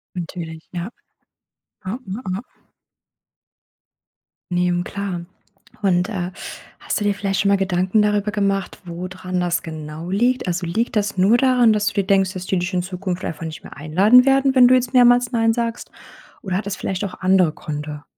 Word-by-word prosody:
Natürlich, 165 -2 -7
ja. 175 +4 -4 0.9
Ah, 200 +4 -4
hm, 195 +6 -5
ah. 195 - -4 2.1
Ne, 180 0 +1
hm, 175 0 0
klar. 190 -4 -5 0.6
Und, 180 0 +2
äh, 185 -3 -3 0.5
hast - - -2
du - - -2
dir 205 - +2
vielleicht 195 0 -2
schon 200 - +2
mal 200 - +4
Gedanken 190 +2 +1
darüber 210 0 +1
gemacht, 195 -2 -1
wo 175 +1 -6
dran 185 0 -4
das 175 0 0
genau 155 0 -7
liegt? 245 +5 +1
Also, 180 0 -1
liegt 225 +9 -1
das 205 -1 0
nur 205 +6 +5
daran, 250 -3 +4
dass 210 -1 0
du - - 0
dir 200 - +1
denkst: 195 -1 +2
„Dass 185 -1 -6
die 190 - +1
dich 180 +2 -2
in 180 - +1
Zukunft 185 0 -4
einfach 165 +1 -5
nicht 160 -1 -7
mehr - - -12
einladen 195 - +5
werden, 270 0 +3
wenn 250 -1 +8
du 255 - +5
jetzt 250 0 0
mehrmals 245 0 +5
nein 225 -1 +2
sagst“? 235 0 -3 0.5
Oder 185 -2 -2
hat 200 - -4
das 200 - -3
vielleicht 190 +1 -3
auch 195 - -7
andere 185 -3 +4
Gründe? 150 -2 -6
190 Hz, 185 wpm, -21 LUFS, 175-215 Hz, 2.1 s, wenn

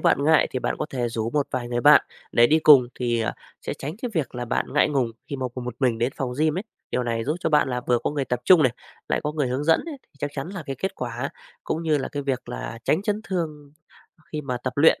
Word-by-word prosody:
bạn 140 - +3
ngại 160 0 +5
thì 130 - -2
bạn - - -2
có 155 - -2
thể 125 -3 -1
rủ 115 0 -2
một 145 0 +1
vài 125 -2 -3
người 120 0 -1
bạn 145 +3 +8 0.3
để 120 - +6
đi 155 +5 +4
cùng 140 -6 +7
thì, 120 -2 0
ờ, 110 - -1 0.3
sẽ - - -4
tránh 150 +6 -6
cái 245 - -2
việc 150 -8 -1
là 125 0 -3
bạn 120 - -2
ngại 145 - +4
ngùng 130 -5 +1 0.2
khi 140 - -4
mà 130 - -2
cùng 125 - -5
một 125 -1 -4
mình 120 -4 +2
đến 120 +3 0
phòng 130 -2 -2
gym 155 +2 +2
ấy. 195 - -4 0.3
Điều - - 0
này 115 -2 -1
giúp 155 +4 -1
cho - - 0
bạn 150 -3 +4
là 125 -1 -1
vừa 120 -1 +3
có - - +1
người 145 -2 -1
tập 125 -1 -2
chung 175 -1 +7
này, 125 - +3 0.4
lại - - +1
có 150 - -1
người 145 -4 0
hướng 130 +4 -2
dẫn 165 +1 +4
ấy, 310 - -5
thì - - -37
chắc 145 +1 -2
chắn 140 +4 -4
là 190 -4 -6
cái 135 -2 -4
kết 190 - -3
quả 120 +2 -4 0.3
cũng 160 - -2
như 155 -3 +2
là - - -3
cái 145 - -4
việc 135 -3 -2
là - - -5
tránh 160 - +2
chấn 210 0 -1
thương 155 -6 -4 0.6
khi 155 - -2
mà 130 -4 -3
tập 130 - -1
luyện 150 +3 +5
135 Hz, 285 wpm, -24 LUFS, 125-155 Hz, 0.6 s, bạn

